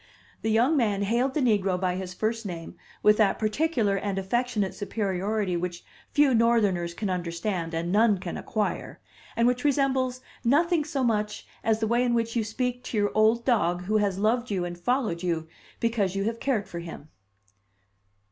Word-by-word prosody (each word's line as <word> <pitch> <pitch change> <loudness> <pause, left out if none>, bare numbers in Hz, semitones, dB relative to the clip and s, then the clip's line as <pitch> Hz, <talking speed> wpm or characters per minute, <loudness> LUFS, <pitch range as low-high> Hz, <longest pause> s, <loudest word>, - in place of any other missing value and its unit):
The 220 - -1
young 240 +8 +3
man 210 -7 +1
hailed 240 +6 +1
the 305 - +1
negro 200 -7 +2
by 180 -1 0
his 185 -1 -5
first 220 +5 -2
name 170 -5 -7 0.3
with 210 0 +6
that 215 -3 +3
particular 220 -2 +1
and 195 0 -2
affectionate 210 +1 -1
superiority 200 -1 -1
which 175 0 -4 0.2
few 290 -3 +4
Northerners 210 -7 +2
can 210 - -3
understand 170 -1 -3
and 170 +2 -2
none 210 0 +4
can 180 -2 -6
acquire, 215 -2 -3 0.4
and 230 +1 +3
which 250 0 +1
resembles 265 -3 +1 0.2
nothing 310 +5 +3
so 280 -3 -2
much 210 -3 -1 0.2
as 225 -1 +2
the - - +2
way 240 +2 +2
in 240 -1 +1
which 230 0 -1
you 230 - +2
speak 250 +3 -3
to 225 - -3
your 205 -1 +2
old 220 +2 +3
dog 180 -8 +2
who 215 +4 +1
has 200 -3 +1
loved 235 +4 +1
you 190 -4 -1
and 175 0 -6
followed 220 -4 0
you, 165 -3 -1 0.3
because 215 -5 0
you 195 - 0
have 225 +2 -2
cared 240 -7 0
for 170 - -6
him. 165 -3 -9
215 Hz, 180 wpm, -27 LUFS, 185-240 Hz, 0.4 s, with